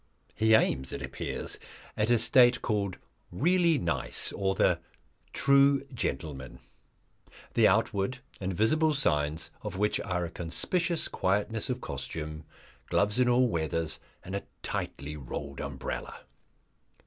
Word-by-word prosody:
He 110 +1 +4
aims, 65 -11 +2
it - - -5
appears, - - -4 0.4
at 105 +2 +1
a 120 - +5
state 120 +2 +5
called 100 -4 -1 0.3
"Really 170 - +3
Nice" 85 -10 -2
or 95 -1 0
the - - +3 0.5
"True 140 0 +4
Gentleman," 75 - -4 1.0
the - - +5
outward 100 +6 +1 0.2
and 95 0 -2
visible 150 - +2
signs 75 - 0
of - - -5
which 105 +1 +1
are 90 -1 -1
a 85 - -7
conspicuous 165 - 0
quietness 105 +6 0
of 125 0 -2
costume, 75 0 -5 0.4
gloves 105 +4 +2
in 125 -1 +4
all 125 +1 +4
weathers, 80 -4 -2 0.2
and 95 - -5
a 100 - -1 0.2
tightly 75 +2 -4
rolled 70 0 -6
umbrella. - - -5
100 Hz, 125 wpm, -29 LUFS, 80-125 Hz, 1.0 s, a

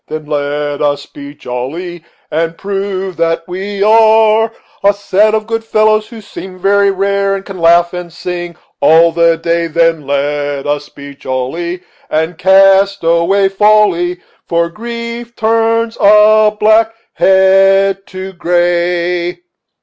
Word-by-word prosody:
Then 155 -1 -6
let 145 0 -3
us 145 -1 -1
be 145 0 -12
jolly, 155 +8 -6 0.3
and 165 +1 -2
prove 195 -2 -4
that 165 0 -1
we 195 +2 -4
are 220 0 +4 0.3
A 200 0 +3
set 205 +2 +1
of 215 -1 -2
good 225 0 -3
fellows, 215 -1 +1
who 230 -2 -11
seem 190 -2 -10
very 200 +2 +2
rare, 195 0 0
And 195 0 -7
can 195 -2 -9
laugh 170 +1 +3
and 180 -1 -7
sing 175 0 -6 0.3
all 160 +3 +5
the 165 0 +2
day. 170 0 -1
Then 165 -2 0
let 145 0 -2
us 145 0 -3
be 140 0 -11
jolly 140 +8 -5 0.3
And 160 +2 -2
cast 195 +1 +4
away 170 +4 +2
folly, 195 -3 +2 0.3
For 170 0 0
grief 235 +3 -7
turns 225 +1 0
a 215 +1 +5
black 220 +1 +3 0.2
head 195 +1 +3
to 190 0 -8
gray." 175 - -1
185 Hz, 135 wpm, -13 LUFS, 165-205 Hz, 0.3 s, all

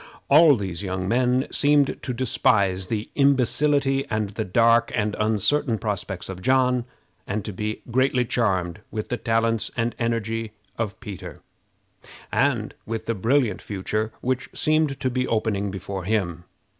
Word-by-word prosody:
All 150 0 +8
these 95 -6 -4
young 95 -1 -3
men 125 +3 +2
seemed 145 -1 +2
to 130 - -3
despise 100 -6 +1
the 110 0 -3
imbecility, 140 0 +2
and 110 -2 -1
the 110 +2 -3
dark 115 +4 +3
and 105 -2 0
uncertain 110 +4 +1
prospects 100 -4 -4
of 95 -1 -7
John, 125 +1 +2 0.4
and 105 +1 -3
to 105 - -5
be 105 +3 -4
greatly 130 0 +2
charmed 95 -8 0
with 110 -1 -5
the 125 - -1
talents 115 -1 +1
and 115 0 0
energy 115 -1 -2 0.2
of 110 -3 -3
Peter, 95 -8 -8 0.9
and - - +1
with 110 0 -4
the 115 - 0
brilliant 115 0 +1
future 105 +2 -2
which 130 0 -1
seemed 155 -3 +1
to 130 -1 0
be 125 +1 -1
opening 105 -3 0
before 95 -1 -5
him. 90 -5 -1
115 Hz, 145 wpm, -24 LUFS, 100-125 Hz, 0.9 s, All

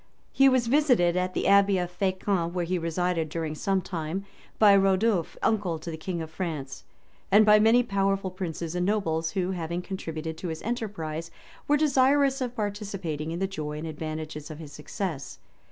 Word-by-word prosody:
He 270 0 +5
was 255 -2 +2
visited 245 - +3
at 185 0 -1
the - - -1
abbey 200 -1 +5
of 180 -1 -2
Fescamp, 185 -2 -1
where 180 -1 -1
he 180 +1 -1
resided 165 0 -1
during 160 -1 -3
some 190 +4 0
time, 175 +2 -4 0.3
by 205 -2 +7
Rodulph, 195 -1 +2
uncle 200 -7 +1
to 160 +2 -7
the - - -4
king 170 +1 -4
of 160 - -9
France, 155 -7 -5 0.5
and 210 +2 +7
by 210 0 +7
many 225 +3 +5
powerful 195 -3 0
princes 170 -3 -4
and 180 0 -1
nobles, 165 -5 0
who, 185 -1 0
having 170 0 -3
contributed 160 -4 -5
to 180 - -4
his 160 -1 -5
enterprise, 170 -9 -4 0.4
were 295 - +4
desirous 275 -1 +3
of 250 -1 -3
participating 195 -8 -3
in 165 - -3
the 190 - 0
joy 155 -6 -5
and 155 - -5
advantages 155 0 -5
of 155 -1 -8
its 150 -3 -10
success. 155 -1 -5
180 Hz, 180 wpm, -27 LUFS, 160-205 Hz, 0.5 s, by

